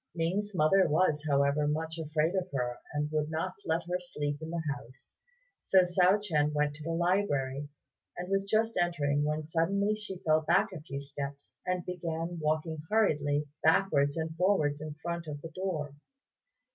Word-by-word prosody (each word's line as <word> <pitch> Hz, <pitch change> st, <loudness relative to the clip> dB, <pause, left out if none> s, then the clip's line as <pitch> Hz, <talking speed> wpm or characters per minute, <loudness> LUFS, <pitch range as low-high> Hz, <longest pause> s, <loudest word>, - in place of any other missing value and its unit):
Ning's 190 Hz, +5 st, -1 dB
mother 185 Hz, +5 st, +5 dB
was, 150 Hz, -1 st, +2 dB
however, 140 Hz, +1 st, +3 dB
much 160 Hz, +2 st, -2 dB
afraid 155 Hz, +2 st, 0 dB
of 185 Hz, -1 st, -1 dB
her, 125 Hz, -3 st, -2 dB
and 150 Hz, 0 st, -2 dB
would 155 Hz, -1 st, 0 dB
not 160 Hz, +4 st, -2 dB
let 165 Hz, +1 st, 0 dB
her 180 Hz, +2 st, -2 dB
sleep 145 Hz, -4 st, -4 dB
in 160 Hz, -, -5 dB
the 170 Hz, -1 st, -2 dB
house; 130 Hz, -1 st, -14 dB, 0.5 s
so 190 Hz, -1 st, +5 dB
Hsiao 180 Hz, +2 st, +4 dB
ch'ien 150 Hz, -7 st, +1 dB
went 150 Hz, 0 st, +1 dB
to 150 Hz, -, -9 dB
the 165 Hz, -, -4 dB
library, 165 Hz, -6 st, 0 dB, 0.5 s
and 180 Hz, -, -4 dB
was 195 Hz, +1 st, +1 dB
just 225 Hz, +2 st, +1 dB
entering 145 Hz, -4 st, +1 dB
when 150 Hz, +1 st, -1 dB
suddenly 195 Hz, +6 st, +1 dB
she 210 Hz, -3 st, -5 dB
fell 155 Hz, -2 st, +2 dB
back 170 Hz, +5 st, +3 dB
a 165 Hz, -, -7 dB
few 140 Hz, -3 st, -5 dB
steps, 140 Hz, 0 st, -7 dB
and 180 Hz, -1 st, -1 dB
began 170 Hz, -1 st, -3 dB
walking 155 Hz, +1 st, 0 dB
hurriedly 150 Hz, -9 st, +2 dB, 0.2 s
backwards 160 Hz, -3 st, +3 dB
and 160 Hz, 0 st, -3 dB
forwards 155 Hz, -6 st, +2 dB
in 155 Hz, -1 st, -6 dB
front 170 Hz, -1 st, -3 dB
of 145 Hz, -1 st, -5 dB
the 165 Hz, -, -6 dB
door. 160 Hz, -5 st, -3 dB
160 Hz, 170 wpm, -31 LUFS, 150-180 Hz, 0.5 s, mother